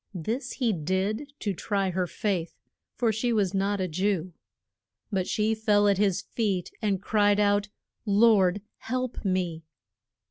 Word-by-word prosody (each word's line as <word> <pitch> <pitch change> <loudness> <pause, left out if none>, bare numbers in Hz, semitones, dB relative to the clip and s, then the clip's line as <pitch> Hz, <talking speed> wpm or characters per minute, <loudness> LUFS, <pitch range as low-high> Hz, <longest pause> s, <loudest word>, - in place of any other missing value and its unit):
This 230 - -3
he 240 -5 0
did 190 - -2
to 205 - -1
try 195 +1 -1
her 180 0 -1
faith, 180 -4 -2 0.4
for 230 0 +2
she 220 +3 -1
was 205 -4 +1
not 200 +1 0
a 185 - 0
Jew. 185 0 -1 0.8
But 190 -2 0
she 215 +1 +1
fell 210 -2 +3
at 200 -1 +3
his 200 -1 +1
feet, 200 -6 -2
and 200 -3 +1
cried 205 -1 +3
out, 205 0 +2 0.4
Lord 200 -2 +4 0.2
help 255 +1 -3
me! 180 -4 -1
205 Hz, 145 wpm, -27 LUFS, 185-215 Hz, 0.8 s, Lord